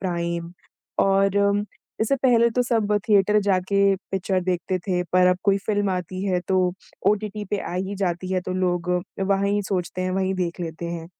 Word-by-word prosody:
Prime 170 -2 -3 0.5
और 195 0 +3 0.6
इससे 225 +5 +2
पहले 235 -3 +4
तो 245 +2 +1
सब 220 -4 +1
थिएटर 210 0 +4
जाके 200 0 +2 0.2
पिक्चर 190 0 0
देखते 185 0 -1
थे, 180 -1 -1
पर 180 0 +5
अब 180 0 +3
कोई 200 -1 +3
फ़िल्म 205 -2 +1
आती 185 0 -3
है, 185 -3 +1
तो 185 0 +1 0.4
ओटीटी 210 0 -2
पे 205 - 0
आ - - -5
ही 190 +2 -2
जाती 185 -1 -2
है 185 - +1
तो 180 - -5
लोग 180 -1 0 0.3
वहीं 200 +1 +1
सोचते 180 -1 -2
हैं, 185 - -1
वहीं 190 0 0
देख 180 -1 -3
लेते 165 0 -5
हैं। 170 -1 -5
190 Hz, 175 wpm, -23 LUFS, 180-200 Hz, 0.6 s, पर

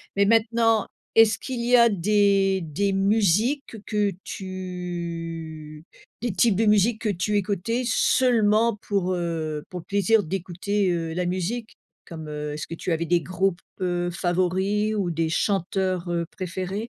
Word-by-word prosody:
Mais 200 0 +4
maintenant, 225 0 +3 0.3
est-ce 225 -1 +6
qu'il 255 -3 -5
y 245 +1 +5
a 235 -1 +7
des 200 -1 +2
des 195 +6 -1
musiques 215 - +1
que 210 -2 0
tu 170 -5 -6 0.4
des 235 -2 -1
types 215 +2 +3
de 225 +4 +2
musiques 215 +2 +3
que 220 - 0
tu 205 +2 -1
écoutais 205 +5 -1
seulement 230 -3 +3
pour, 190 -3 0
heu, 160 -4 -3
pour 180 - -6
le 165 - -12
plaisir 205 +2 +2
d'écouter, 190 +3 -1
heu, 165 -2 -2
la 180 +1 -1
musique? 185 +6 -3 0.3
Comme, 160 -2 -8
heu, 150 0 -4
est-ce 150 - -5
que 165 - -6
tu 175 - -4
avais 165 0 0
des 170 +1 +2
groupes, 185 +1 -1 0.2
heu, 175 -1 0
favoris 185 +4 0
ou 195 -4 0
des 165 0 -1
chanteurs, 185 0 0
heu, 170 -1 -1
préférés? 190 +4 -4
190 Hz, 155 wpm, -24 LUFS, 170-210 Hz, 0.4 s, a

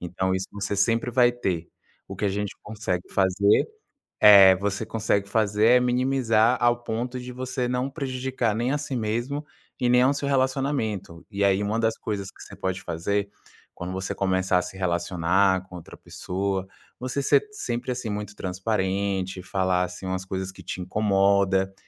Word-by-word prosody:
Então 95 +2 -1
isso 95 0 -3
você 100 0 -3
sempre 115 +4 +1
vai 120 0 +5
ter. 90 -8 -3 0.4
O - - -7
que - - -3
a - - +3
gente 100 +1 -3
consegue 105 -4 -3
fazer, 100 - +3 0.5
eh, 100 -3 +9
você 100 +2 -2
consegue 100 -3 -1
fazer 105 0 +2
é - - +4
minimizar 125 -2 +2
ao 120 0 +2
ponto 120 +2 -3
de 125 0 -7
você 125 0 -3
não 125 +2 -1
prejudicar 130 -4 -2
nem 120 +3 0
a 145 - +1
si 145 -2 -4
mesmo 120 +6 -2 0.3
e 125 - +1
nem 125 0 +5
ao 135 +2 +4
seu 140 0 -3
relacionamento. 130 - -1
E 100 0 -1
aí 100 0 +3
uma 105 +2 -1
das 110 -1 +1
coisas 100 -2 -4
que - - -17
você 100 - -11
pode 95 -1 -3
fazer 100 +5 -2 0.5
quando 90 +1 -6
você 95 0 -3
começar 95 -1 +1
a - - -1
se 90 +2 -8
relacionar 90 +1 +1
com 90 - -12
outra 85 - -12
pessoa, 95 +1 -3 0.3
você 130 +2 -2
ser - - +4
sempre, 125 - -3
assim, 125 -1 -4
muito 105 0 -5
transparente, 95 0 -2
falar, 95 -1 0
assim, 90 +1 -6
umas 95 0 -2
coisas 95 0 -4
que 95 - -14
te 90 - -5
incomoda, 95 0 +2
100 Hz, 175 wpm, -25 LUFS, 95-120 Hz, 0.5 s, eh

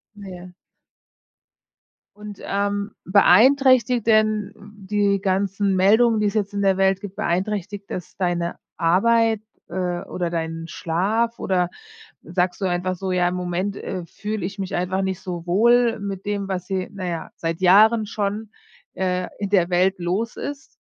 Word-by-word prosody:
Ja. 185 -3 -10 1.6
Und, 210 -1 -10
ähm, 200 +1 -1
beeinträchtigt 245 +4 +5
denn 215 -2 +2 0.2
die 205 -1 0
ganzen 195 +1 0
Meldungen, 220 +4 +4
die 210 - +2
es 200 - -3
jetzt 205 -1 -1
in 200 - -2
der 195 -1 +3
Welt 195 0 +2
gibt, 200 -2 -8
beeinträchtigt 200 +2 -2
das 180 - -6
deine 175 -2 -1 0.2
Arbeit, 225 +6 +3 0.3
äh, 175 0 -2
oder 175 -3 -3
deinen 165 0 -4
Schlaf 210 +9 -1
oder 180 -2 0 0.5
sagst 180 +2 -1
du - - +1
einfach 185 0 -1
so: 190 +1 -3
„Ja, 180 -1 +2
im 180 - -3
Moment, 180 +2 -2
äh, 185 -4 -5
fühle 210 -1 -4
ich 195 +2 -8
mich 190 -2 -4
einfach 185 +2 -1
nicht 190 -1 -2
so 175 -3 -6
wohl 235 +5 +3
mit 195 -1 -5
dem, 200 -1 -2
was 180 -2 -3
hier, 190 -1 -2
na 195 -2 -6
ja, 170 -2 -4
seit 165 +1 -3
Jahren 215 +4 +5
schon, 210 0 -3 0.5
äh, 180 -1 -1
in 200 -1 -3
der 180 -4 +3
Welt 185 +1 +2
los 190 +6 -2
ist“? 280 -1 -6
195 Hz, 155 wpm, -22 LUFS, 180-210 Hz, 1.6 s, beeinträchtigt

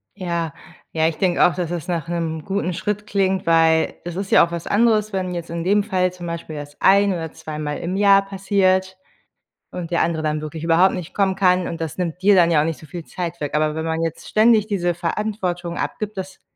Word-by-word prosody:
Ja. 170 -4 -3 0.4
Ja, 160 0 +1
ich 165 - -2
denke 180 -2 +3
auch, 175 - +3
dass 175 -3 -2
es 170 -4 -4
nach 170 -4 -2
'nem 165 -2 -3
guten 195 -2 -2
Schritt 210 +4 -3
klingt, 190 -2 0
weil 165 -1 +3
es 175 -1 -5
ist 195 +1 -4
ja - - +7
auch 170 - -12
was 170 -1 -5
anderes, 215 -1 +2
wenn 185 -1 -2
jetzt 170 -1 -5
in 170 0 -3
dem 200 +3 +3
Fall 185 -3 0
zum 180 -1 -9
Beispiel 170 -2 -6
das 145 0 -8
ein 200 0 +5
oder 165 -3 -4
zweimal 150 -1 -5
im 180 +2 -3
Jahr 200 0 +5
passiert 190 -1 +1 0.7
und 175 -2 -6
der 170 - +2
andere 160 -1 -1
dann 155 0 0
wirklich 155 +1 -6
überhaupt 170 +3 +4
nicht 180 -4 -7
kommen 195 -2 +1
kann 185 -2 +2
und 165 - -6
das 160 -2 -4
nimmt 180 -1 -3
dir 205 +1 +6
dann 175 -3 +5
ja 160 -3 +4
auch - - +1
nicht 165 -1 -3
so 155 - -12
viel 170 +2 -8
Zeit 175 -1 -5
weg. 145 -1 -4
Aber 155 0 +1
wenn 160 - -3
man 160 0 -1
jetzt 165 -1 -4
ständig 215 -1 +4
diese 175 -5 0
Verantwortung 175 -1 -3
abgibt, 215 -1 -4
das 190 0 -7
175 Hz, 230 wpm, -21 LUFS, 165-195 Hz, 0.7 s, ja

